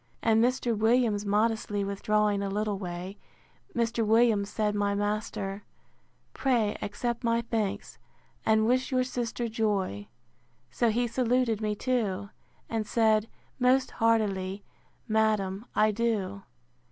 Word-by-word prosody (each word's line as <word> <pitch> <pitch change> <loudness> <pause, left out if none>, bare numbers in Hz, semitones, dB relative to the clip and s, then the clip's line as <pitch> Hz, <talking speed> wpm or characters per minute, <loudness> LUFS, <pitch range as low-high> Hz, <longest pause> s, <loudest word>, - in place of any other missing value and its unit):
And 225 0 +4
Mr. 245 -1 +1
Williams 220 -1 +2
modestly 210 -1 +1
withdrawing 205 +1 +1
a 200 - -2
little 205 0 -1
way; 180 +1 -6 0.6
Mr. 230 -1 0
Williams, 220 -2 +3
said 210 -1 0
my 205 -1 0
master, 205 -1 -2 0.7
pray 235 -6 +1
accept 235 +4 -3
my 230 0 +2
thanks, 220 -4 -3 0.4
and 220 0 +3
wish 255 +3 +1
your 255 -1 +2
sister 240 -2 -3
joy. 205 - -1 0.6
So 235 - +2
he 240 +3 +1
saluted 240 -2 +1
me 210 -1 -1
too; 205 -5 -1 0.4
and 220 -2 -2
said, 220 -1 +2 0.3
Most 255 +1 +3
heartily, 200 -4 0 0.4
madam, 215 -1 +1
I 215 0 +4
do. 205 -3 -1
215 Hz, 120 wpm, -28 LUFS, 205-235 Hz, 0.7 s, And